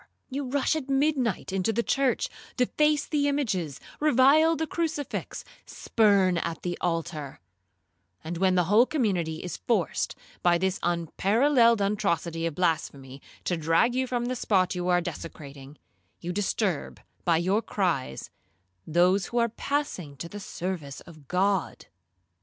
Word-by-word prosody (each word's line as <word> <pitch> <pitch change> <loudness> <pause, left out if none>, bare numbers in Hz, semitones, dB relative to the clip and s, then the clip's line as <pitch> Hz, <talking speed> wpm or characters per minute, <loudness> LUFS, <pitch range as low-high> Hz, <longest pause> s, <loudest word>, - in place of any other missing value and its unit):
You 275 +1 -3
rush 285 +3 +1
at 285 -4 -4
midnight 270 - 0
into 195 +3 +1
the 235 +2 0
church, 270 0 +1 0.3
deface 300 +4 +2
the 290 -2 0
images, 195 - -1 0.2
revile 305 +3 +5
the 320 - -1
crucifix, 315 -3 -3 0.2
spurn 200 -5 +2
at 165 - -4
the 175 -1 -2
altar; 165 -5 -3 0.8
and 165 +1 -5
when 190 -1 +3
the 180 - +4
whole 210 +8 +4
community 180 - -1
is 180 - -5
forced, 215 -8 -1 0.3
by 175 -1 +4
this 190 +2 -1
unparalleled 225 - +3
atrocity 175 -5 0
of 165 - -5
blasphemy, 140 -6 -2 0.2
to 180 - 0
drag 165 +9 +2
you 260 +1 0
from 245 -1 -1
the 255 +1 -2
spot 190 -6 +1
you 180 -1 -3
are 175 -1 +3
desecrating, 150 -5 -8 0.4
you 175 +1 -4
disturb, 195 -3 -1 0.2
by 170 -2 +3
your 190 +6 +1
cries, 175 - -2 0.6
those 180 +4 +3
who 240 - -4
are 235 0 +3
passing 215 - -3
to 170 - -6
the 205 +4 -8
service 175 -7 -5
of 155 -5 -15
God. 195 +2 0
190 Hz, 140 wpm, -27 LUFS, 170-250 Hz, 0.8 s, revile